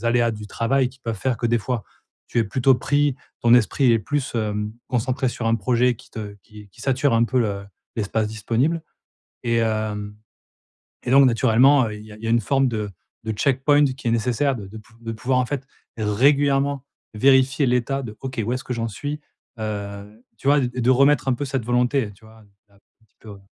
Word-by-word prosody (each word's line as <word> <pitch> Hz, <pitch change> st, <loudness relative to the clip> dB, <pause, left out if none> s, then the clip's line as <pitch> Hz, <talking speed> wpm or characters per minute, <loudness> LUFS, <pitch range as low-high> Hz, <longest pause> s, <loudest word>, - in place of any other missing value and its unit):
des -, -, -11 dB
aléas 115 Hz, 0 st, +2 dB
du 105 Hz, -1 st, -8 dB
travail 125 Hz, +4 st, +1 dB
qui 130 Hz, +1 st, -19 dB
peuvent 115 Hz, -2 st, -4 dB
faire 130 Hz, +3 st, 0 dB
que 120 Hz, -, -1 dB
des 120 Hz, 0 st, +2 dB
fois 115 Hz, -1 st, -3 dB, 0.4 s
tu -, -, -1 dB
es 115 Hz, -, +3 dB
plutôt 130 Hz, +5 st, +3 dB
pris, 145 Hz, +2 st, +1 dB, 0.3 s
ton 120 Hz, -, +4 dB
esprit 125 Hz, +2 st, +3 dB
est 115 Hz, -, +4 dB
plus, 140 Hz, +5 st, -2 dB
hem, 105 Hz, -1 st, -2 dB, 0.2 s
concentré 130 Hz, +1 st, 0 dB
sur 120 Hz, -1 st, -4 dB
un 115 Hz, -, +3 dB
projet 125 Hz, +1 st, +1 dB
qui 125 Hz, +3 st, -18 dB
te 105 Hz, -2 st, -7 dB
qui 105 Hz, -2 st, -14 dB
qui 95 Hz, -, -18 dB
sature 135 Hz, -1 st, +1 dB
un 115 Hz, -, +4 dB
peu 130 Hz, +2 st, 0 dB
le 100 Hz, -3 st, -2 dB, 0.3 s
l'espace 110 Hz, 0 st, -1 dB
disponible 120 Hz, +9 st, -1 dB, 0.6 s
et 115 Hz, -1 st, +1 dB
hem, 110 Hz, -2 st, -2 dB, 0.9 s
et -, -, -2 dB
donc, 135 Hz, +1 st, +7 dB
naturellement, 125 Hz, +3 st, +4 dB
il 105 Hz, 0 st, -8 dB
y 110 Hz, -, -13 dB
a -, -, -12 dB
il 110 Hz, -, -16 dB
y -, -, -2 dB
a -, -, 0 dB
une 115 Hz, -, +3 dB
forme 135 Hz, +5 st, +2 dB
de 105 Hz, -3 st, -3 dB, 0.3 s
de 110 Hz, -, -1 dB
checkpoint 140 Hz, +5 st, +3 dB
qui 130 Hz, -2 st, -3 dB
est -, -, +2 dB
nécessaire 125 Hz, +4 st, +1 dB
de 105 Hz, -5 st, -8 dB
de 105 Hz, +3 st, -10 dB
pou 110 Hz, -, -20 dB
de 115 Hz, -1 st, -5 dB
pouvoir 125 Hz, +3 st, 0 dB
en 125 Hz, -, +1 dB
fait 135 Hz, -1 st, -4 dB, 0.3 s
régulièrement 140 Hz, +5 st, +2 dB, 0.3 s
vérifier 135 Hz, +3 st, +4 dB
l'état 125 Hz, +3 st, 0 dB
de: 110 Hz, -3 st, -7 dB
«OK 130 Hz, -2 st, -5 dB
où 120 Hz, -, -1 dB
est-ce 130 Hz, -, -4 dB
que 125 Hz, -, -4 dB
j'en 115 Hz, -1 st, -2 dB
suis» 145 Hz, +8 st, -5 dB, 0.4 s
heu, 105 Hz, +1 st, -6 dB
tu -, -, -6 dB
vois? 145 Hz, +1 st, +5 dB
et 125 Hz, -, +1 dB
de 120 Hz, -, +2 dB
remettre 140 Hz, +2 st, +4 dB
un 130 Hz, -, +3 dB
peu 145 Hz, -, -3 dB
cette 130 Hz, -4 st, -3 dB
volonté, 125 Hz, +1 st, +1 dB
heu, -, -, -13 dB
tu 100 Hz, -, -24 dB
vois? 110 Hz, 0 st, -17 dB, 0.3 s
Ah 100 Hz, -, -25 dB, 0.3 s
petit -, -, -45 dB
peu 110 Hz, -, -13 dB
heu 100 Hz, -, -11 dB
120 Hz, 220 wpm, -22 LUFS, 110-135 Hz, 0.9 s, donc